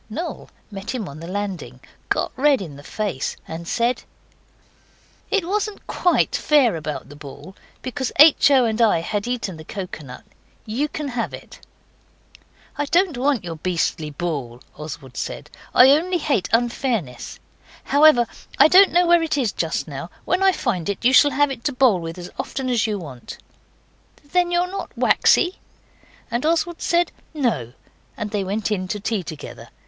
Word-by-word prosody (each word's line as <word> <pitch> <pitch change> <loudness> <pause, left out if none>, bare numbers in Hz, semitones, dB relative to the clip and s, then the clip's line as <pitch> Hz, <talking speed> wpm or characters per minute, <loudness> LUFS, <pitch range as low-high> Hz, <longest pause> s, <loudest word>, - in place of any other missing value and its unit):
Noel 320 +11 -5 0.2
met 200 +5 -5
him 220 -6 -4
on 140 +2 -9
the 165 - -8
landing, 185 -10 -5 0.3
got - - 0
red 275 +1 +3
in 160 -7 -7
the 140 - -11
face, 190 -3 -3
and 165 +1 -7
said 235 +5 0 1.3
'It 390 -5 0
wasn't 415 +1 -2
QUITE 355 - +1
fair 275 - +3
about 155 -3 -5
the 145 - -11
ball, 145 +5 -11 0.3
because 260 0 -3
H. 300 0 +7
O. 265 -3 +5
and 225 0 0
I 220 -6 +5
had 205 +5 -3
eaten 235 -8 -3
the 155 - -10
coconut. 155 - -8 0.4
YOU 245 +8 -1
can 300 -1 -5
have 240 -2 -3
it.' - - -14 1.2
'I 290 - 0
don't 345 +1 +2
want 265 -1 +1
your 165 -2 -6
beastly 165 -2 -1
ball,' 145 -7 -4
Oswald 140 -4 -9
said, - - -5 0.2
'only 310 +8 +6
I - - -6
hate 280 - 0
unfairness. 230 - -1 0.4
However, 285 -4 +5 0.3
I - - +7
don't 385 +3 +7
know 355 +1 +4
where 345 0 +5
it 315 -2 -1
is 245 -7 +1
just 165 0 -2
now. 145 +3 -7 0.2
When 365 +2 +1
I 385 0 +5
find 200 - -2
it 200 +3 -4
you 255 - +5
shall 290 +3 +7
have 285 +1 +2
it 240 -3 -7
to 290 - +1
bowl 250 -7 +4
with 165 0 -6
as 180 0 -8
often 260 -2 -3
as 230 -2 +2
you 210 -1 -1
want.' 140 -9 -9 0.9
'Then 360 0 +2
you're 350 0 +2
not 395 - -6
waxy?' 360 +2 +3 0.7
And 235 +2 -1
Oswald 335 +2 0
said 345 +1 +1 0.2
'No' 225 - -1 0.4
and 210 - -4
they 205 -2 -1
went 205 +3 -2
in 185 -3 -1
to 210 - -3
tea 210 0 -1
together. 155 -4 -9
230 Hz, 170 wpm, -22 LUFS, -, 1.3 s, H